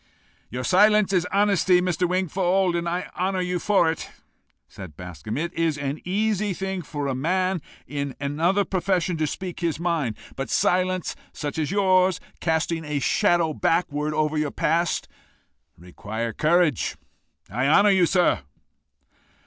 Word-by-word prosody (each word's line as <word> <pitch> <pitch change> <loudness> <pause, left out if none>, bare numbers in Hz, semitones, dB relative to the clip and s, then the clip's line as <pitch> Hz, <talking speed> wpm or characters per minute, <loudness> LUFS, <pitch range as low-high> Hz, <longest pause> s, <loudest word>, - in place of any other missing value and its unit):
"Your 125 +2 -4
silence 210 - +4
is 180 -1 +2
honesty, 195 -3 +3
Mr. 180 -1 0
Wingfold, 185 0 +1
and 170 0 -1
I 180 +2 -2
honour 185 +1 0
you 180 0 -1
for 195 -4 +3
it," 165 - -7 0.6
said 90 -7 -11
Bascombe. 90 - -6
"It 170 +4 -3
is 165 -3 0
an 140 +1 -4
easy 205 +1 0
thing 190 0 -3
for 145 -2 -5
a 135 - -1
man 185 +6 0 0.2
in 140 -2 -4
another 165 +8 +1
profession 185 -1 0
to 155 -1 0
speak 180 +2 -5
his 165 -3 -1
mind, 165 -10 -1 0.2
but 135 -3 -4
silence 185 0 +1 0.2
such 145 +1 -4
as 150 - -1
yours, 185 -2 +3 0.2
casting 160 0 0
a 150 -1 -3
shadow 170 +1 +2
backward 155 -2 0
over 155 0 +1
your 150 -1 0
past, 165 +4 0 0.7
require 110 +6 -5
courage: 165 - +2 0.5
I 125 +6 0
honour 200 +7 +5
you, 185 -3 +4
sir." 180 -1 +3
170 Hz, 145 wpm, -24 LUFS, 150-185 Hz, 0.7 s, honour